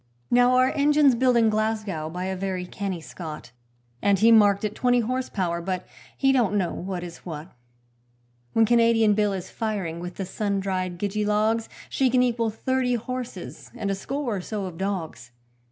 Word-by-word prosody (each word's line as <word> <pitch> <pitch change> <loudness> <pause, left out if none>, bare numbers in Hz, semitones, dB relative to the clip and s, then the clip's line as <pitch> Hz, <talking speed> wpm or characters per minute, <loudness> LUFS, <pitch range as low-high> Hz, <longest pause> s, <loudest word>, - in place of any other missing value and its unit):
Now, 245 +1 +5
our 255 +1 +4
engine's 290 -1 +4
built 250 0 +3
in 225 -2 +4
Glasgow 215 -7 -1
by 180 +3 -4
a 190 0 -2
very 185 -1 -3
canny 190 -1 -4
Scot, 155 -6 -8 0.5
And 200 -1 +3
he 225 +4 +5
marked 205 -3 +5
it 210 -1 -1
twenty 245 +1 +2
horse 255 +3 -2
power, 170 -3 -1
but 185 +1 -3 0.3
he 270 -1 +3
don't 230 -6 +2
know 185 -3 0
what 180 -1 -4
is 170 -1 -8
what: 160 0 -8 1.0
When 225 - +5
Canadian 230 -2 +4
Bill 210 0 +2
is 190 -1 -6
firing 195 -7 -3
with 175 +1 -6
the 195 - -4
sun 200 +1 -2
dried 185 -2 -2
gidgee 205 +3 -1
logs, 215 +2 +1 0.2
She 265 -1 +1
can 250 0 +3
equal 235 -2 +1
thirty 250 +3 0
horses 230 - -6
and 200 - -2
a - - +1
score 250 +2 -3
or - - -4
so 205 +1 -4
of 175 -3 -8
dogs. 180 -10 -4
210 Hz, 185 wpm, -25 LUFS, 185-235 Hz, 1.0 s, Now